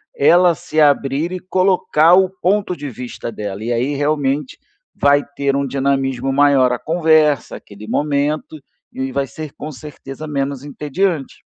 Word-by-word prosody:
ela 175 - +5
se 155 +1 -1
abrir 145 +3 +2
e 185 - -4
colocar 180 -3 +3
o 190 0 +4
ponto 190 0 -1
de 145 -3 -6
vista 125 -1 -7
dela. 105 -1 -6
E 120 - -2
aí, 125 +5 0
realmente 145 -1 -1 0.4
vai 145 0 +4
ter 140 -1 0
um 140 -1 -1
dinamismo 135 -1 -1
maior 140 -2 +4
a 125 - -2
conversa, 155 -3 +2
aquele 105 +1 -13
momento, 150 +3 -1 0.3
e 130 0 -4
vai 140 +1 -1
ser 155 +4 -8
com 150 - -7
certeza 145 0 -9
menos 140 -2 -3
entediante. 150 +2 -3
145 Hz, 150 wpm, -18 LUFS, 135-155 Hz, 0.4 s, ela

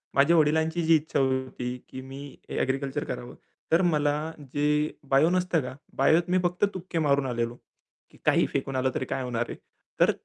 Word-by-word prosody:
माझ्या 145 +5 +5
वडिलांची 160 +2 +2
जी 165 0 +5
इच्छा 155 -1 0
होती, 130 -2 -1
की 130 - -7
मी 135 +1 -9
एग्रीकल्चर 135 +2 -1
करावं, 125 -1 -6 0.4
तर 165 +3 +5
मला 145 -1 +2 0.4
जे 150 +1 +1 0.2
बायो 140 +5 +5
नसतं 180 -2 +1
का? 125 0 -6 0.2
बायोत 170 +2 +3
मी 185 - +3
फक्त 180 +3 +2
तुक्के 185 -2 -4
मारून 140 -3 +2
आलेलो. 120 -2 -2 0.6
की - - -19
काहीही - - +4
फेकून 135 -1 -2
आलं, 130 0 +1
तरी 130 - -1
काय 130 - -3
होणार 120 -1 -1
आहे. - - -6 0.4
तर - - +6
145 Hz, 175 wpm, -27 LUFS, 130-160 Hz, 0.6 s, तर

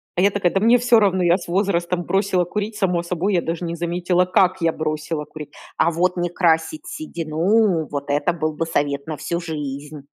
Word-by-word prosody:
А 175 - +1
я 200 +2 +4
такая: 195 -3 +1
"Да 195 - +2
мне 230 +4 +5
всё 245 -1 +5
равно, 190 -3 +2
я 175 +1 +4
с 175 - -10
возрастом 175 -1 0
бросила 190 -1 +1
курить 210 +4 -4
само 180 -4 0
собой, 180 +3 -1
я 175 - +2
даже 165 +1 -3
не 170 0 -3
заметила, 175 +1 0
как 185 0 +2
я 165 -1 +3
бросила 155 0 -3
курить". 150 -1 -10 0.3
А 170 - +3
вот 180 +2 0
не 175 0 0
красить 175 - 0
седину- 170 - 0
вот 140 0 -4
это 145 +4 +1
был 155 -2 -2
бы 165 - -2
совет 145 -3 -1
на 155 -2 -4
всю 170 +4 -3
жизнь. 150 -3 -6
175 Hz, 205 wpm, -21 LUFS, 160-190 Hz, 0.3 s, мне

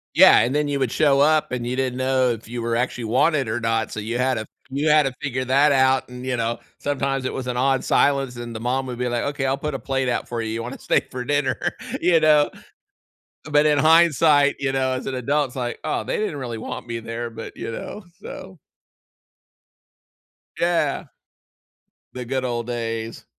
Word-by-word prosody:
Yeah, - - +8
and 125 +5 +1
then 150 -1 +1
you 140 -1 -1
would 130 -4 -1
show 140 -3 +3
up, 155 0 +3
and 120 -1 -3
you 125 - -2
didn't 130 -1 -1
know 130 -1 +2
if 115 -2 -4
you 120 +1 -5
were 115 0 0
actually 125 -1 -2
wanted 130 +2 +2
or 115 +2 -1
not, 115 -1 -1
so 105 - -4
you 115 +3 -3
had 130 0 +1
to 110 -1 -4 0.3
you 145 +3 0
had 150 0 +6
to 135 -1 -2
figure 130 -2 -2
that 140 +3 +4
out, 130 0 +3
and, 125 0 -8
you 130 -1 -1
know, 115 0 -1 0.2
sometimes 135 -2 -1
it - - -2
was 130 - -4
an 125 - -2
odd 135 +1 +2
silence 135 -3 +2
and 120 -1 -7
the - - -4
mom 130 +3 -1
would 125 -1 -5
be 125 0 -1
like, 120 -1 -1
"Okay. 140 -1 -2
I'll 135 +1 +1
put 150 -1 -3
a - - -3
plate 135 -2 -1
out - - -2
for 120 -1 -3
you. 110 - -3
You 115 +1 -3
wanna 125 - -7
stay - - +2
for 125 -1 -4
dinner?" 145 -1 0 0.4
You 170 -2 +4
know? 150 -1 +4 0.9
But 150 0 +2
in 150 -1 +3
hindsight, 155 -2 +5
you 135 -1 0
know, 130 -1 0
as 130 - -4
an 135 - -3
adult, 140 +2 0
it's - - -15
like, 120 -2 -3
"Oh, - - -1
they - - -2
didn't 210 -9 -2
really 120 -4 -5
want 115 - -6
me 115 0 -4
there." 115 +1 -5
But 115 0 -9
you - - -5
know? 210 - -7 0.2
So 185 -2 -9 2.0
Yeah. 170 -5 +1 1.1
The 125 -1 -5
good 130 +1 -2
old 120 -1 -3
days. 115 -1 -4
130 Hz, 215 wpm, -22 LUFS, 120-145 Hz, 2.0 s, Yeah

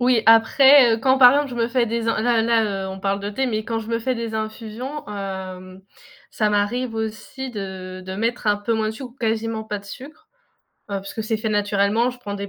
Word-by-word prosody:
Oui, 245 -2 +3
après, 245 +3 +7
heu, - - -3
quand 260 +2 +2
par 250 -2 +9
exemple, 285 +1 +1
je - - -6
me 230 -1 0
fais 240 -1 +1
des 230 0 -2
in 225 - +1
là 230 -1 +2
là, 220 -4 +1
heu, - - -5
on 190 - -7
parle 195 +1 -1
de 205 - -4
thé, 265 +5 -1
mais 215 -2 -2
quand 225 -1 -2
je 220 - -7
me 230 0 -1
fais 255 +2 -1
des 230 -1 -4
infusions, 225 +6 -5
hem, 190 -2 -7 0.5
ça 215 -1 +1
m'arrive 225 +4 0
aussi 220 +4 -5
de 190 -2 -7
de 190 0 -6
mettre 230 +1 -1
un 205 - +3
peu 205 +3 -2
moins 220 -1 0
de - - -1
sucre 245 +2 -8
ou - - -22
quasiment 225 -2 -2
pas 210 -1 -4
de 200 - -16
sucre, 285 - -11 0.6
heu, 200 -1 -2
puisque 210 +3 -6
c'est 220 +1 -1
fait 220 0 -3
naturellement, 205 +2 +1
je 250 0 -6
prends 205 -5 -7
des 200 0 -5
220 Hz, 240 wpm, -22 LUFS, 205-240 Hz, 0.6 s, par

